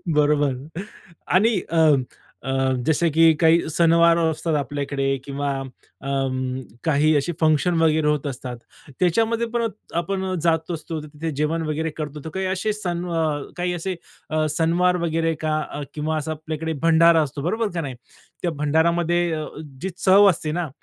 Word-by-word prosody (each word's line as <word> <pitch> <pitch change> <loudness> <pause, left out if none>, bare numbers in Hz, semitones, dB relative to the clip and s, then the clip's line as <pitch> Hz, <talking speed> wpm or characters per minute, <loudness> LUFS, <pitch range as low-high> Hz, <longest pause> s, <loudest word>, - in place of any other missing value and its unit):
बरोबर. 145 -2 +3 0.7
आणि 205 +2 +3
अ, 165 - -1 0.7
अ, 135 0 -1 0.2
जसं 160 +2 +2
की 165 +1 +6
काही 165 0 +4
सणवार 170 +1 +4
असतात 160 -1 0
आपल्याकडे 140 -1 -1
किंवा 140 0 -3 0.5
अ, 135 - -5 0.7
काही 155 0 +3
असे 160 +5 -1
फंक्शन 160 +2 +3
वगैरे 155 -1 +3
होत 150 -1 0
असतात, 125 -2 -6 0.4
त्याच्यामध्ये 225 +6 +2
पण 235 -1 +1 0.3
आपण 190 +2 -3
अ, 185 - -2
जात 165 0 +1
असतो 160 0 -4
तिथे 155 +2 -5
जेवण 150 +3 0
वगैरे 160 +1 -1
करतो, 150 -1 -5
तर 160 - -4
काही 190 0 -2
असे 210 +3 -1
सण 175 -4 -3
वा 165 -2 0
अ, - - -6 0.2
काही 180 0 -1
असे 180 +2 -3 0.3
अ, 155 0 +1
सणवार 175 +2 +2
वगैरे 165 0 0
का 155 0 +1
अ, 145 - -5
किंवा 155 +1 -2
असा 155 +1 -3
आपल्याकडे 155 +1 -4
भंडारा 165 0 +6
असतो 140 0 -5
बरोबर 220 +5 0
का 170 - -2
नाही, 135 -4 -5 0.5
त्या 175 - 0
भंडारामध्ये 170 +3 +2
अ, 155 -1 -3 0.4
जी 190 - -2
चव 200 +1 +6
असते 155 -3 -1
ना, 170 -1 -2
160 Hz, 160 wpm, -23 LUFS, 150-175 Hz, 0.7 s, की